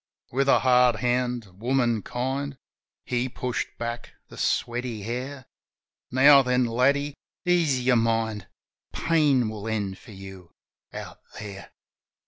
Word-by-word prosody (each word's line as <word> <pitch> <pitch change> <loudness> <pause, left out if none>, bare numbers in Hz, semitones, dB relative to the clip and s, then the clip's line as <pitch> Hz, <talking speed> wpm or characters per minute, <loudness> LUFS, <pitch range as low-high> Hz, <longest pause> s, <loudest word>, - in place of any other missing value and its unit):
With 135 +2 +1
a - - +6
hard 125 -2 +5
hand, 125 0 0
womarf 120 -3 +1
kind. 135 +2 -3 0.5
He 125 +1 -1
pushed 125 -1 -3
back 120 0 -5 0.2
the - - -12
sweaty 120 -3 -1
hair. 130 +4 -5 0.6
"Now 140 +2 +7
then, 125 -1 +2
laddie, 140 +5 +1 0.3
ease 160 -8 +2
your 125 -2 +4
mind. 115 -3 0 0.5
Pain 145 -7 +2
will 110 0 -6
end 100 -4 -2
for - - -17
you 95 -2 -11 0.4
out - - -8 0.2
There. 100 -2 -8
125 Hz, 120 wpm, -26 LUFS, 115-130 Hz, 0.6 s, Now